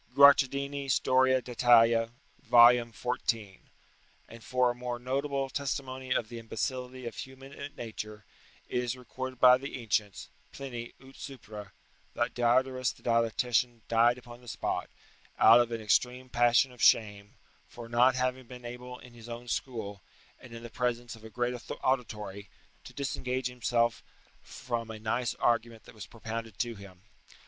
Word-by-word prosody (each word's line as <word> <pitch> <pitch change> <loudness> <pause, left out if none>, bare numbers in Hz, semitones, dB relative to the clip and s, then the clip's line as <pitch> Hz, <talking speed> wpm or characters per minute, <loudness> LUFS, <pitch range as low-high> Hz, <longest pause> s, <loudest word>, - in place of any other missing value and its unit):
[Guicciardini, 140 0 +5
Storia 130 0 +3
d'Italia, 115 -2 +4 0.3
vol. 120 0 +8 0.2
xiv.] 110 -3 -3 0.7
And 115 -1 -13
for 125 -1 +2
a - - -4
more 125 0 -4
notable 135 +2 -2
testimony 130 -2 -4
of 115 - +1
the 120 0 -8
imbecility 125 +2 -4
of 115 - -6
human 135 +2 -8
nature, 110 -3 -7 0.4
it 125 - -1
is 125 +1 -3
recorded 130 0 -7
by 125 0 +7
the 135 0 -6
ancients 105 -3 -2 0.2
[Pliny, 120 -4 -7
'ut 135 0 -16
supra'] 105 -6 -9 0.5
that - - 0
Diodorus 130 +1 +2
the - - -19
dialectician 115 +1 +1
died 115 +1 +4
upon 120 -1 -12
the 120 - -17
spot, - - -3 0.5
out 115 +2 +8
of 120 -1 -1
an 115 -1 -3
extreme 125 +4 +1
passion 120 +2 +3
of 125 -2 -13
shame, 105 -2 +3 0.3
for 120 -1 -10
not 120 +2 +4
having 130 0 -1
been 125 -1 -11
able 125 +1 -8
in 125 -1 -15
his 120 0 -12
own 120 +1 -7
school, 110 -6 -4 0.4
and 125 - -14
in 115 0 -9
the 120 - -9
presence 120 -1 -2
of 110 - -17
a 110 - -9
great 120 +2 -1 0.3
auditory, 105 -6 -2 0.4
to - - -11
disengage 130 -2 -3
himself 120 -1 0 0.4
from 120 -2 -5
a 110 - -6
nice 115 +3 -1
argument 115 -1 0
that - - -15
was 110 -2 -9
propounded 115 -2 -7
to 120 -1 -1
him. 100 -3 -14
120 Hz, 155 wpm, -30 LUFS, 115-130 Hz, 0.7 s, vol